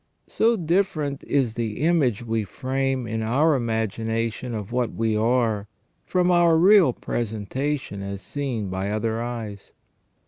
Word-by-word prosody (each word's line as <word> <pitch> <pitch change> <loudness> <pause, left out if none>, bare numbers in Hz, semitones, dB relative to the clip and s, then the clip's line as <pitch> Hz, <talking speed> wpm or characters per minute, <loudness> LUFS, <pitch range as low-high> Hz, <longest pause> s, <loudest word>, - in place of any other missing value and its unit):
So 230 +1 +2
different 160 -5 0
is 130 -6 +1
the 115 -1 -3
image 140 - +2
we 115 -1 0
frame 130 +4 -2
in 110 0 -3
our 140 +9 +3
imagination 115 0 -2
of 105 -1 -5
what 125 -2 -1
we 110 -1 0
are, 110 -2 +1 0.4
from 180 -1 +2
our 170 -2 +5
real 185 -3 +6
presentation 120 +1 -3
as 100 0 -6
seen 125 -8 -3
by 95 +1 -2
other 110 +2 -1
eyes. 115 -4 -6
120 Hz, 135 wpm, -24 LUFS, 110-145 Hz, 0.4 s, real